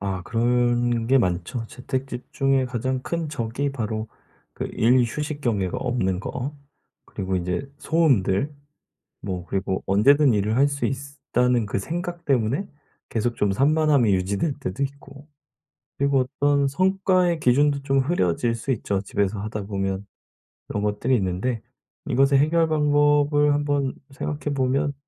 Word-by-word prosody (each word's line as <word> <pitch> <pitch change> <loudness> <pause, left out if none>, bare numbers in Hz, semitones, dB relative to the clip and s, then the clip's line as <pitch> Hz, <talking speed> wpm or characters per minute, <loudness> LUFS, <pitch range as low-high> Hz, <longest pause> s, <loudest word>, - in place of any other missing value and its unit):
아 95 -2 -3
그런 120 +1 +1
게 135 +3 +4
많죠. 115 +3 -1
재택 130 +1 -4
집중에 135 +1 0
가장 130 +1 -2
큰 165 0 -3
적이 140 0 -2
바로 110 -3 -3 0.4
그 - - -5
일, 125 +3 +4
휴식 150 +4 -4
경계가 100 -9 -1
없는 95 -8 -1
거 130 +7 -4 0.5
그리고 95 0 -3
인제 90 +9 -3
소음들 145 - +2 0.7
뭐 90 -3 -4
그리고 95 0 -2
'언제든 135 +8 +5
일을 105 +2 0
할 140 +2 +4
수 140 0 -3
있으 140 +1 -5 0.2
다.'는 125 -2 +3
그 100 - -2
생각 175 - -5
때문에 135 - 0 0.4
계속 120 +1 -1
좀 100 -1 +1
산만함이 140 -1 +3
유지될 100 - -1
때도 95 +9 -3
있고 140 +1 -7 0.7
그리고 140 -2 +2
어떤 145 -1 +3
성과의 185 +2 +2
기준도 140 +2 +3
좀 135 -1 +2
흐려질 120 - +1
수 115 +4 -3
있죠 100 -5 -1
집에서 100 0 -1
하다 105 0 -4
보면. 95 -1 -3 0.7
이런 105 - -2
것들이 105 +5 0
있는데 100 +4 -1 0.5
이것의 135 +2 +3
해결 165 +2 +3
방법을 145 -1 +3
한번 145 -2 0 0.2
생각해 145 +1 -4
보면 135 +2 0
130 Hz, 285 characters per minute, -24 LUFS, 105-145 Hz, 0.7 s, 언제든